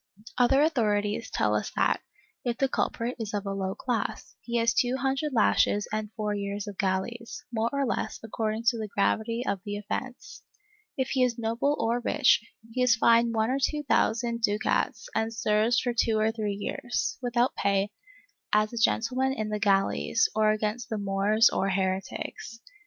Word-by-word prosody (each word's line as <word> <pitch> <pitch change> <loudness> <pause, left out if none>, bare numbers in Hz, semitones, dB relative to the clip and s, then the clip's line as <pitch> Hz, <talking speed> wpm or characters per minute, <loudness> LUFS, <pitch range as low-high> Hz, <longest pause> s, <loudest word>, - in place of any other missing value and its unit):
^ - - -20 0.2
Other 270 +3 +5
authorities 215 -7 0
tell - - +1
us - - -1
that, - - +2 0.4
if 240 -1 -1
the 270 - +2
culprit 245 -1 -2
is 215 -1 -4
of 205 0 -3
a 195 - -2
low 190 -1 -3
class, 240 -5 -3
he 235 0 -2
has 230 -1 +3
two 250 +1 +1
hundred 270 +3 -1
lashes 210 -3 +2
and 215 -1 -3
four 210 -2 -2
years 200 0 -3
of 205 -2 -9
galleys, 200 +5 -2
more 225 0 +1
or 280 -1 0
less 240 - -2
according 220 0 -2
to 235 -2 -3
the 215 - -3
gravity 220 +4 0
of 195 -7 -1
the 205 0 -4
offence; 245 +5 -6 0.6
if 265 -1 -1
he 265 - +1
is 245 -1 +1
a - - -6
noble 230 +6 0
or 235 +2 +1
rich, 260 -1 +3 0.3
he 255 - -2
is 250 -2 +5
fined 230 0 +4
one 220 +2 +1
or 270 - 0
two 295 +2 0
thousand 235 -3 +1
ducats 215 - 0
and 225 +1 -1
serves 215 +2 +2
for 245 - -1
two 225 -1 +2
or 215 +1 +2
three 210 -3 -3
years, 240 +4 -3
without 245 0 +1
pay, 200 +1 +1 0.6
as 215 +2 +2
a 235 - -3
gentle 230 +4 +1
man 265 0 +2
in 215 -4 -3
the 210 0 -2
galleys, 195 - +2
or 215 0 +3
against 215 +3 -1
the 220 - -2
Moors 200 +3 +3
or 195 - 0
heretics. 190 +4 -3
225 Hz, 185 wpm, -27 LUFS, 205-245 Hz, 0.6 s, Other